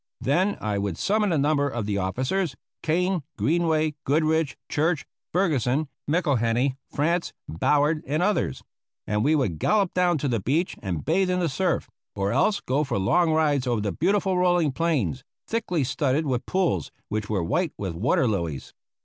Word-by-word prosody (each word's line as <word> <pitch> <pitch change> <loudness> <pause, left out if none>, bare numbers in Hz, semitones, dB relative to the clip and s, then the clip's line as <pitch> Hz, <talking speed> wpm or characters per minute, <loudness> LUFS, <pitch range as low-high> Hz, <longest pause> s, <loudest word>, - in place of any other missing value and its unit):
Then 185 +9 +1
I 105 -2 -1
would 100 -4 -2
summon 210 -1 +1
a 160 - +2
number 145 0 +2
of 120 -5 -3
the 100 -1 -1
officers, 130 - -1 0.3
Kane, 180 +2 +1 0.2
Greenway, 160 -1 +1
Goodrich, 155 +1 +1
Church, 155 0 0 0.3
Ferguson, 150 - +1 0.2
McIlhenny, 130 -6 +1
Frantz, 170 +4 0
Ballard 150 - +1
and 155 +5 0
others, 180 - 0 0.4
and 105 +1 0
we 155 +4 +3
would 100 - 0
gallop 205 -4 +2
down 180 -2 +2
to 145 - -2
the 120 -4 0
beach 150 - 0
and 85 -8 -3
bathe 190 -1 +2
in 180 0 +1
the 175 - +1
surf, 170 +4 0 0.3
or 100 0 0
else 200 - +2
go 140 +4 0
for 130 -4 -2
long 165 - +3
rides 150 -4 +2
over 120 -3 +1
the 100 -1 -1
beautiful 190 - +1
rolling 175 -4 +3
plains, 135 - -1 0.2
thickly 180 -9 -1
studded 140 +3 0
with 125 -3 -2
pools 175 - 0 0.2
which 105 -1 -3
were 100 -5 0
white 160 - 0
with 95 -4 -3
water 115 +8 +1
lilies. 85 -10 -3
150 Hz, 165 wpm, -25 LUFS, 120-175 Hz, 0.4 s, we